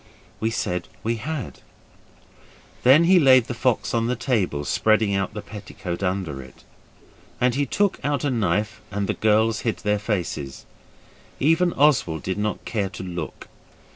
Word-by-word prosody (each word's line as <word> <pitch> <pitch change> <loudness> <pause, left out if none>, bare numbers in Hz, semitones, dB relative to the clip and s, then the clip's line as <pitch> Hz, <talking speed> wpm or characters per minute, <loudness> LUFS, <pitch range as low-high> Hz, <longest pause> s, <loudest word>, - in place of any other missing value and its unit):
We 110 - 0
said 90 -5 -2 0.2
we 115 +1 0
had. 150 +2 -5 1.2
Then 135 +6 +6
he 180 +2 +6
laid 130 -5 +6
the 125 - -4
fox 120 0 0
on 115 -1 +1
the 125 - 0
table, 105 - -1
spreading 110 +2 +2
out 95 +2 -1
the 105 - -5
petticoat 95 -4 -7
under 90 -7 -2
it, 65 0 -15 0.8
and 125 0 +3
he 140 +2 0
took 200 +8 +1
out 145 -1 0
a 145 - +1
knife 105 0 0
and 100 0 -2
the - - -1
girls 110 0 +2
hid 115 - -1
their 105 0 +1
faces. 90 -10 -3 0.7
Even 165 +5 +3
Oswald 130 - +2
did 95 +2 -2
not 105 0 -2
care 105 -4 -1
to - - -8
look. 85 -3 -6
110 Hz, 160 wpm, -23 LUFS, 95-130 Hz, 1.2 s, Then